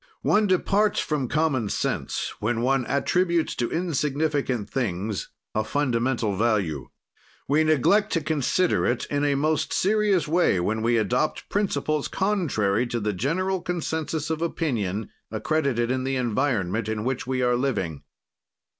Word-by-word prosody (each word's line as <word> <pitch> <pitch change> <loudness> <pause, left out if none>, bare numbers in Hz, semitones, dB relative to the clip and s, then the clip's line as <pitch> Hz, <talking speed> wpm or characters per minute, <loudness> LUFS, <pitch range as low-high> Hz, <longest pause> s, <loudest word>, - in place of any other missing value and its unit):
One 210 0 +3
departs 200 +3 +2
from 145 -4 -1
common 140 -6 +1
sense - - -2
when 115 +2 0
one 130 0 +1
attributes 170 +3 +1
to 120 - 0
insignificant 145 - -1
things 105 -4 -2 0.2
a 110 - +1
fundamental 120 -4 0
value. 95 - 0 0.6
We 150 +3 +3
neglect 170 - +3
to 165 - +1
consider 160 +4 +1
it 120 0 0
in 145 0 0
a 145 -1 +2
most 155 +2 0
serious 205 -3 +2
way 160 - +3
when 110 +5 -1
we 115 +1 +2
adopt 125 +7 0
principles 155 -7 0
contrary 125 - 0
to 120 0 -2
the 105 -1 -1
general 180 - -1
consensus 160 -3 -2
of 160 0 -2
opinion 110 - -2 0.2
accredited 135 -6 0
in 130 0 -1
the 135 0 -1
environment 115 -4 0
in 110 -1 -2
which 125 0 -2
we 130 -1 0
are 125 0 +3
living. 110 - -1
135 Hz, 140 wpm, -25 LUFS, 115-160 Hz, 0.6 s, One